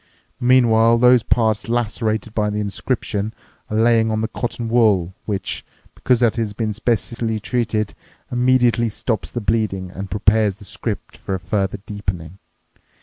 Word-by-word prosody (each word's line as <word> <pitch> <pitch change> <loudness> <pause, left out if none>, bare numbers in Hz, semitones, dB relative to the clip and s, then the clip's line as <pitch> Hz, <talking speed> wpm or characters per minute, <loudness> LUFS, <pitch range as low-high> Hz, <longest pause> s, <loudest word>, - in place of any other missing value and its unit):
Meanwhile 115 -2 +5
those 125 0 +6
parts 110 -1 +1
lacerated 110 -2 -1
by 105 -2 0
the 105 - -3
inscription 105 +1 -2 0.3
are 110 - -1
lying 115 0 +4
on 110 0 0
the 110 - 0
cotton 120 0 -4
wool 105 -7 +3
which, 100 -3 -2 0.3
because 125 -1 +1
it 115 0 +2
has 110 -3 -1
been 110 0 -2
specially 115 0 -1
treated, 110 -1 -1 0.4
immediately 125 -1 +3
stops 110 +1 -3
the 120 - -3
bleeding 100 -4 -1
and 95 +1 -7
prepares 105 +1 +2
the 105 0 -14
script 100 +1 -5
for 95 - -4
a - - -4
further 95 +1 -1
deepening. 95 -4 -5
110 Hz, 145 wpm, -20 LUFS, 100-115 Hz, 0.4 s, those